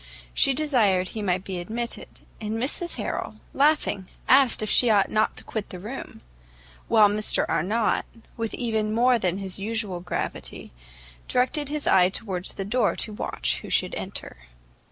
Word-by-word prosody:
She 270 - +3
desired 220 -11 +2
he 220 - -5
might 185 -2 0
be 190 -2 -4
admitted; 230 +7 -4 0.3
and 215 0 -3
Mrs 290 +8 0
Harrel, - - -4 0.2
laughing, 285 -10 +2 0.2
asked 260 -4 +5
if 215 - -2
she 245 - +6
ought 205 -3 +3
not 215 0 +1
to - - -1
quit 220 -3 -5
the 180 - -7
room; 215 +9 -8 0.7
while 215 -2 +6
Mr 210 +1 0
Arnott, 215 +7 +1 0.3
with 225 -1 -3
even 220 -3 -1
more 245 +1 +4
than 185 -2 0
his 195 -1 -4
usual 210 -3 -2
gravity, 175 - -5 0.6
directed 270 +3 +1
his 300 0 -3
eye 180 -1 +5
towards 190 -2 -3
the 195 - -5
door 230 +1 +1
to 215 - -2
watch - - -2
who - - -9
should - - +1
enter. - - -5
215 Hz, 160 wpm, -25 LUFS, 190-245 Hz, 0.7 s, she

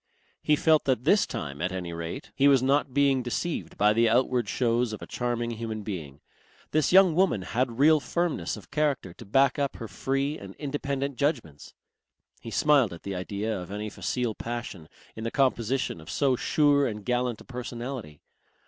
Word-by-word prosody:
He 150 - +3
felt 155 0 +3
that 130 -3 +1
this 190 +7 +4
time 70 -2 -5
at 95 - 0
any 90 -2 -4
rate 85 - -6
he 140 - +4
was 135 -3 +5
not 140 +1 +2
being 135 -1 +3
deceived 135 +7 -3
by 105 +1 +4
the 115 +1 +3
outward 125 -1 +2
shows 120 -2 +1
of 110 - -7
a - - -6
charming 120 -1 -2
human 110 -2 -5
being. 80 -9 -6 0.5
This 155 -2 +2
young 185 -2 +7
woman 165 - +2
had 120 +3 -1
real 155 +3 +6
firmness 170 +5 -2
of - - -14
character 145 - 0
to - - -12
back 135 +8 +3
up 140 -1 -1
her 115 - -7
free 135 +9 -2
and - - -10
independent 140 -2 -3
judgments. 120 - -2 0.6
He 115 - -8
smiled 135 -2 +3
at 85 - -11
the 100 - -4
idea 100 +4 -3
of 90 -1 -6
any 105 +1 -5
facile 120 0 -2
passion 110 -9 -6 0.3
in 110 - -7
the 115 - -1
composition 130 - 0
of 80 - -13
so 135 -3 +2
sure 145 +1 +3
and 105 -2 -6
gallant 125 -2 0
a - - -11
personality. 120 - -6
125 Hz, 185 wpm, -27 LUFS, 105-140 Hz, 0.6 s, young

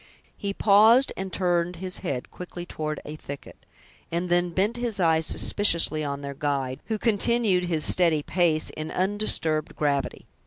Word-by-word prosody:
He 200 - -4
paused 220 +6 +5
and 190 0 -5
turned 175 -1 0
his 185 +1 -4
head 140 -9 -4
quickly 175 -1 -8
toward 155 -3 -4
a 150 +1 -7
thicket, 140 -2 -10 0.4
and 175 +2 -2
then 175 0 +2
bent 195 +7 0
his 240 -4 -2
eyes 160 -2 +3
suspiciously 165 -6 +2
on 140 -1 -4
their 140 0 -5
guide, 135 -2 -2
who 220 - -2
continued 215 -3 +1
his 165 -3 -1
steady 165 -5 +3
pace, 165 -3 +1
in 155 0 -6
undisturbed 185 -6 0
gravity. 140 -2 -1
175 Hz, 155 wpm, -25 LUFS, 155-195 Hz, 0.4 s, paused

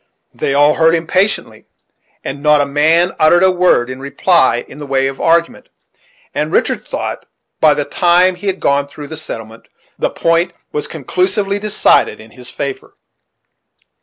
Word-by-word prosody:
They 140 - -2
all 145 +1 +4
heard 165 0 +3
him 165 0 -3
patiently, 190 +5 -1 0.6
and 140 +1 -6
not 150 0 +4
a 145 - +2
man 160 +5 +2
uttered 175 +3 +4
a 190 - +5
word 180 -9 +2
in 130 0 -7
reply 140 -1 +1
in 145 - -13
the 145 - -8
way 135 -1 +1
of 135 0 -4
argument, 170 +1 0 0.6
and - - -2
Richard - - 0
thought, - - -5 0.3
by - - +4
the - - -2
time 180 +1 +3
that 180 - -15
he 205 - -6
had 190 -1 -1
gone 140 0 +1
through 145 0 -10
the 160 - -6
settlement, 115 -7 -9 0.3
the - - 0
point 165 +1 0 0.2
was 150 - -3
conclusively 190 - -1
decided 210 0 +2
in 110 0 -14
his 125 +1 -11
favor. 140 -1 -6
155 Hz, 170 wpm, -15 LUFS, 140-180 Hz, 0.6 s, a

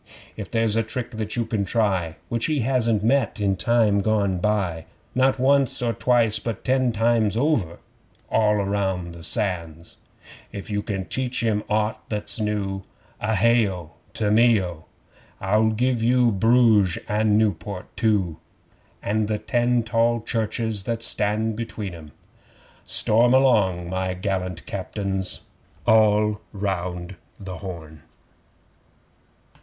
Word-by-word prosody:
'If - - -7
there's 115 -2 +1
a 115 - +3
trick 115 +3 -5
that 110 -2 -4
you 120 -1 0
can 110 -2 -1
try 95 -6 0
Which 115 -1 -1
he 155 -4 0
hasn't 115 -4 +1
met 120 0 +1
in 100 -2 +1
time 105 +1 +2
gone 100 -3 +1
by, 90 -5 -1 0.3
Not 130 +1 +2
once 135 0 +3
or 120 -2 0
twice, 115 -2 +2
but 115 -1 -5
ten 130 -1 +2
times 115 -1 +1
over; 115 - 0 0.5
(All 105 -1 +2
round 95 -3 -1
the 85 - -11
Sands!) 85 -5 -3 0.5
'If 100 +1 -7
you 105 0 0
can 95 -3 -4
teach 130 +1 -2
him 110 -2 +1
aught 105 +1 0
that's 105 +1 -1
new, 100 -2 -2 0.4
(A 110 +1 0
hay 115 +1 +3
O! 90 -4 -8 0.2
To 105 -1 0
me 115 0 +5
O!) 85 -4 -6 0.5
I'll 105 +3 +2
give 120 +2 0
you 120 0 +3
Bruges 110 -3 +4
and 105 0 +2
Niewport 105 -3 -1
too, 100 -8 +1 0.7
And 105 +1 0
the 105 0 -1
ten 120 +1 +1
tall 115 +1 +1
churches 110 -1 -2
that 115 -1 -2
stand 110 +1 0
between 110 -4 -5
'em.' 80 -3 -11 0.8
Storm 120 +3 +4
along, 105 -10 +3
my 95 0 -2
gallant 95 -2 -3
Captains! 95 -1 -3 0.4
(All 105 -1 +3
round 90 -2 -4 0.2
the 95 -3 -7
Horn!) 80 -4 -9
105 Hz, 135 wpm, -23 LUFS, 95-115 Hz, 0.8 s, me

